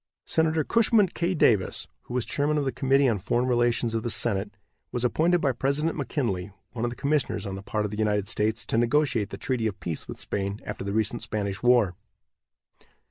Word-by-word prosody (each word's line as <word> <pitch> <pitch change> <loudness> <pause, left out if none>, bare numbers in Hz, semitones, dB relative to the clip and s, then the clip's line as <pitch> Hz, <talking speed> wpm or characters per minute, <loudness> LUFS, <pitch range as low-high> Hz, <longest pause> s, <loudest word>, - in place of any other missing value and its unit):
Senator 160 -1 +2
Cushman 220 - +3
K. 175 +2 -1
Davis, 105 - +2 0.2
who 120 - -6
was 125 - +1
chairman 150 +1 0
of 145 - 0
the 135 - 0
committee 135 +1 +3
on 110 -5 +1
foreign 120 +7 0
relations 120 -1 +1
of 115 - 0
the 120 - -3
senate, 100 -3 +2 0.4
was 120 0 -1
appointed 170 +7 +2
by 140 - +2
President 140 +6 0
McKinley 115 - -2 0.2
one 115 -1 -4
of 120 - +1
the 120 - -7
commissioners 140 -4 0
on 100 - -4
the 95 - -6
part 105 +1 -2
of 105 - -4
the 105 - -5
United 105 -2 +1
States 110 +1 0
to 115 - +1
negotiate 120 -4 +1
the - - -7
treaty 125 -4 -1
of 100 - -5
peace 80 -3 -4
with - - -8
Spain 100 +1 -3
after - - -5
the 100 - -3
recent 110 +2 0
Spanish 100 -3 -3
war. 120 -6 +4
120 Hz, 205 wpm, -26 LUFS, 105-140 Hz, 0.4 s, war